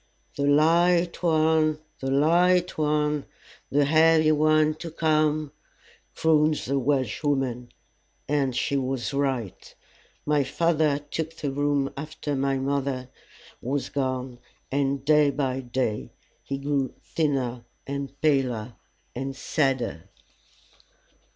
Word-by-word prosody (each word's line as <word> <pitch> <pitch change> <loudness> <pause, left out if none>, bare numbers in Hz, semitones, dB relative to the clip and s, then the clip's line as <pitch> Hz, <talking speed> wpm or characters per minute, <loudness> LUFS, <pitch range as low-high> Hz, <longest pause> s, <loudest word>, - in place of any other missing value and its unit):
"The 140 0 0
light 170 +4 +3
one, 160 -2 +2 0.2
the 135 - -3
light 175 +6 +3
one 150 -1 0 0.4
the 145 +1 +2
heavy 160 +1 +5
one 155 0 +3
to 165 - -6
come," 155 -2 +1 0.6
crooned 155 -1 +3
the 140 -1 -1
Welshwoman. 130 -1 -1 0.6
And 140 -3 0
she 140 +3 0
was 130 -1 -2
right. 135 -8 -3 0.5
My 150 -1 +2
father 155 +1 +1
took 160 +2 -5
the 145 -4 -3
room 145 0 0
after 150 0 -4
my 135 0 0
mother 135 -1 -2 0.5
was 135 +3 -2
gone, 130 -2 -3 0.3
and 140 0 0
day 150 -1 +5
by 135 -2 -1
day 125 -4 -2 0.3
he 135 - -4
grew 140 -1 -1
thinner 130 -6 -1 0.2
and 140 0 -5
paler 125 -6 +1 0.4
and 135 +2 -4
sadder. 130 - -1
140 Hz, 110 wpm, -25 LUFS, 135-155 Hz, 0.6 s, heavy